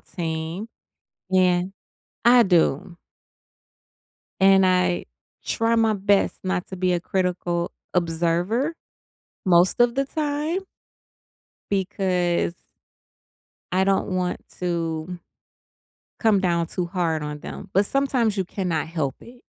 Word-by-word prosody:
team. 165 +4 -4 0.6
Yeah. 180 -1 +4 0.6
I 240 0 +7
do 175 -1 +1 1.4
and 195 0 +6
I 180 -1 +2 0.4
try 230 0 +1
my 225 -1 +3
best 200 0 +2
not 185 -1 -1
to 190 - -7
be 180 0 +1
a 175 - 0
critical 175 -1 -1 0.2
observer 175 - 0 0.7
most 180 +4 +4
of 240 0 +4
the 275 - +1
time 300 +5 -2 1.1
because 185 -3 0 1.2
I 185 +1 +3
don't 195 +1 +1
want 180 -1 -2 0.2
to 170 0 -2 1.0
come 220 -3 +3
down 170 -3 +1
too 180 +1 -3
hard 170 -3 -1
on 150 0 -5
them, - - -8
but 195 +2 +4
sometimes 250 -5 +1
you 190 - 0
cannot 175 -5 -2
help 155 -5 -2
it. 245 +1 -15
185 Hz, 110 wpm, -23 LUFS, 170-205 Hz, 1.4 s, I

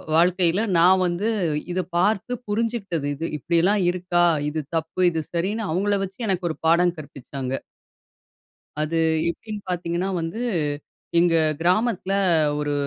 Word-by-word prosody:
வாழ்க்கையில 180 +4 +3
நான் 185 +2 +5
வந்து 180 +5 -1 0.4
இதை 185 - 0
பார்த்து 205 +6 +1 0.2
புரிஞ்சுகிட்டது 205 -8 -1
இது. 165 +4 -3
இப்டியெல்லாம் 175 +7 +2
இருக்கா? 175 -1 +1 0.2
இது 155 +1 -3 0.2
தப்பு, 160 +3 -3
இது 160 -1 -2
சரின்னு 200 +6 -1
அவுங்கள 200 +4 +1
வச்சு 190 +5 -13
எனக்கு 185 -2 0
ஒரு - - -8
பாடம் 175 +1 +4
கற்பிச்சாங்க. 135 -2 -6 1.2
அது 155 +2 -1 0.3
எப்டின்னு 210 +4 -6
பாத்தீங்கன்னா 175 +1 -2
வந்து, 165 +9 -4 0.8
எங்க 170 -1 +3 0.3
கிராமத்தில, 195 +2 +1 0.5
ஒரு 145 0 -1
180 Hz, 120 wpm, -23 LUFS, 165-195 Hz, 1.2 s, நான்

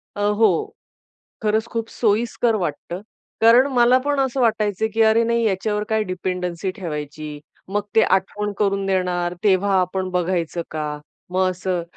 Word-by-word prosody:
अ, - - -7 0.2
हो. 425 - +2 0.7
खरंच 220 0 +1
खूप 230 -1 -2
सोयीस्कर 230 +1 +1
वाटतं, 175 -1 -4 0.4
कारण 235 +4 +6
मला 245 0 +5
पण 290 -1 +1
असं 265 -1 0
वाटायचं, 215 -3 +1
की 225 - +1
अरे, 220 +1 +4
नाही, 235 0 +1
याच्यावर 210 +1 0
काय 220 -1 +1
डिपेंडन्सी 180 -1 -3
ठेवायची? 150 -3 -6 0.3
मग 205 +2 -1
ते 220 - +7
आठवण 205 +2 0
करून 195 -1 0
देणार, 180 -2 0
तेव्हा 200 0 +3
आपण 185 +1 -1
बघायचं 175 -1 -1
का? 150 -1 -3 0.3
मग 185 0 +2
असं, 180 -1 -2
195 Hz, 145 wpm, -21 LUFS, 180-225 Hz, 0.7 s, ते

